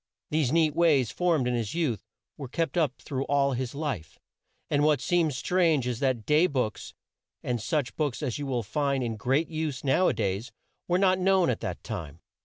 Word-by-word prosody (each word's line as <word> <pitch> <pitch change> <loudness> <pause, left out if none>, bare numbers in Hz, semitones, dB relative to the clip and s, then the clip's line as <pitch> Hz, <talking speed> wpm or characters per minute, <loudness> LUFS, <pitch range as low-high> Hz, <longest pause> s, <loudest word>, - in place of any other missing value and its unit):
These 150 -5 +1
neat 160 -2 +3
ways, 155 -8 +3
formed 165 -8 +1
in 125 - 0
his 115 0 -2
youth, 150 -11 -1 0.3
were 140 -3 -7
kept 165 +8 -2
up 155 -7 +1
through 135 -2 -3
all 140 -1 +2
his 130 +1 -3
life, 140 - -4 0.5
and 145 0 +1
what 150 -2 +4
seems 160 -3 +1
strange 165 -5 +2
is 125 -2 -2
that 130 -6 0
day 155 +4 +4
books, 125 - -3 0.5
and 120 -2 -2
such 125 +5 -1
books 150 -2 -2
as 130 -1 -2
you 145 - -4
will 125 -3 -1
find 140 +4 0
in 115 -2 -2
great 135 +9 0
use 155 -5 -3
now 145 +7 +3
a - - +2
days 100 +2 -2 0.4
were 180 - +2
not 185 -1 +3
known 185 -5 +3
at 115 - -3
that 95 -7 -5
time. 85 -8 -6
140 Hz, 200 wpm, -27 LUFS, 120-160 Hz, 0.5 s, what